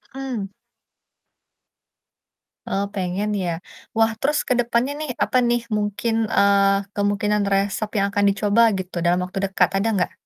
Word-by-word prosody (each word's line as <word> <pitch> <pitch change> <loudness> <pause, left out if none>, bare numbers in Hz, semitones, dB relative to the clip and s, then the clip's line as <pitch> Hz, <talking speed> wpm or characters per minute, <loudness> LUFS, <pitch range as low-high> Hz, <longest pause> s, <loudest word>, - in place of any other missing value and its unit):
Mhm. 260 -7 -4 2.2
Oh, 195 +1 -1
pengen 190 +2 -2
ya? 175 -3 -3 0.3
Wah, 225 0 +3
terus 295 +2 +1
ke 255 - +3
depannya 240 +2 +1
nih, 305 -2 -4
apa 255 - +1
nih, 240 0 +1 0.2
mungkin, 210 +2 -1 0.2
eee, 200 0 +3
kemungkinan 205 +1 +1
resep 200 +2 0
yang 200 - +2
akan 205 0 +1
dicoba, 205 +2 +2 0.2
gitu, 185 0 -7
dalam 175 +1 +3
waktu 185 +1 -5
dekat, 195 - +2
ada 200 +3 0
nggak? 185 - 0
205 Hz, 140 wpm, -22 LUFS, 195-230 Hz, 2.2 s, Wah